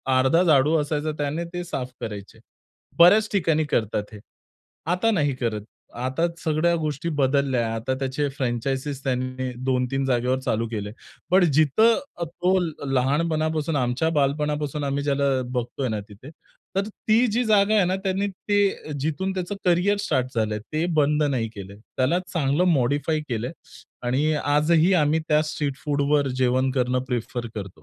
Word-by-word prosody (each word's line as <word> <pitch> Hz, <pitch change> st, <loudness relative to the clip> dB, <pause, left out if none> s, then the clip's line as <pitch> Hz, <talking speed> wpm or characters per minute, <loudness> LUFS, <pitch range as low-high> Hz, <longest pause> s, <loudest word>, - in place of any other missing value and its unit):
अर्धा 135 Hz, +7 st, +4 dB
झाडू 150 Hz, -1 st, +4 dB
असायचा, 150 Hz, +1 st, -2 dB
त्याने 150 Hz, +4 st, -2 dB
ते 175 Hz, -, -3 dB
साफ 130 Hz, -6 st, -4 dB
करायचे. 105 Hz, -3 st, -7 dB, 0.6 s
बर्‍याच 205 Hz, +5 st, +7 dB
ठिकाणी 160 Hz, -5 st, +2 dB
करतात 105 Hz, -1 st, -2 dB
हे. 105 Hz, -, -9 dB, 0.7 s
आता 225 Hz, +5 st, +1 dB
नाही 145 Hz, -8 st, +1 dB
करत. 115 Hz, -4 st, -2 dB, 0.3 s
आता 130 Hz, +7 st, 0 dB, 0.2 s
सगळ्या 160 Hz, +2 st, +2 dB
गोष्टी 155 Hz, +1 st, -3 dB
बदलल्या 135 Hz, -2 st, +2 dB
आहे. 115 Hz, -, -2 dB
आता 115 Hz, +4 st, -2 dB
त्याचे 135 Hz, +2 st, -1 dB
फ्रँचायझी 135 Hz, +2 st, -2 dB
त्यांनी 130 Hz, -1 st, -2 dB
2-3 130 Hz, +1 st, 0 dB
जागेवर 125 Hz, 0 st, +1 dB
चालू 115 Hz, -3 st, -1 dB
केले. 105 Hz, -2 st, -4 dB, 0.4 s
पण 185 Hz, 0 st, +6 dB
जिथं 215 Hz, -, +4 dB, 0.2 s
तो 180 Hz, +3 st, 0 dB, 0.4 s
लहानपणापासून, 155 Hz, +3 st, 0 dB
आमच्या 130 Hz, +4 st, +1 dB
बालपणापासून 150 Hz, +1 st, -1 dB
आम्ही 140 Hz, +1 st, -1 dB
ज्याला 140 Hz, -1 st, +1 dB
अ, -, -, -2 dB
बघतोय 125 Hz, +1 st, -2 dB
ना, 110 Hz, -1 st, -2 dB
तिथे 110 Hz, +8 st, -12 dB, 0.5 s
तर 200 Hz, +2 st, +1 dB, 0.2 s
ती 230 Hz, +3 st, +5 dB
जी 245 Hz, +3 st, +1 dB
जागा 210 Hz, 0 st, +4 dB
आहे 205 Hz, -, +5 dB
ना 185 Hz, +2 st, 0 dB
त्याने 195 Hz, +1 st, 0 dB, 0.2 s
ते 200 Hz, -7 st, +1 dB
जिथून 160 Hz, +7 st, -1 dB
त्याचं 185 Hz, +2 st, -3 dB
करिअर 180 Hz, +4 st, +3 dB
स्टार्ट 130 Hz, -10 st, 0 dB
झालंय, 110 Hz, -1 st, 0 dB
ते 155 Hz, +9 st, -3 dB
बंद 150 Hz, 0 st, +3 dB
नाही 130 Hz, -6 st, 0 dB
केलंय. 100 Hz, 0 st, -9 dB, 0.2 s
त्याला 140 Hz, +8 st, +2 dB
चांगलं 150 Hz, +1 st, +1 dB
मॉडिफाय 145 Hz, +4 st, +1 dB
केलंय 120 Hz, +3 st, -2 dB, 0.6 s
आणि 140 Hz, +5 st, +1 dB
आजही 155 Hz, +5 st, +3 dB
आम्ही 155 Hz, -2 st, +3 dB
त्या 150 Hz, 0 st, +4 dB
स्ट्रीट 145 Hz, -2 st, -3 dB
फूडवर 145 Hz, -1 st, +1 dB
जेवण 130 Hz, +1 st, +2 dB
करणं 125 Hz, -1 st, 0 dB
प्रिफर 120 Hz, 0 st, -3 dB
करतो. 100 Hz, -2 st, -5 dB
145 Hz, 150 wpm, -24 LUFS, 130-165 Hz, 0.7 s, बर्‍याच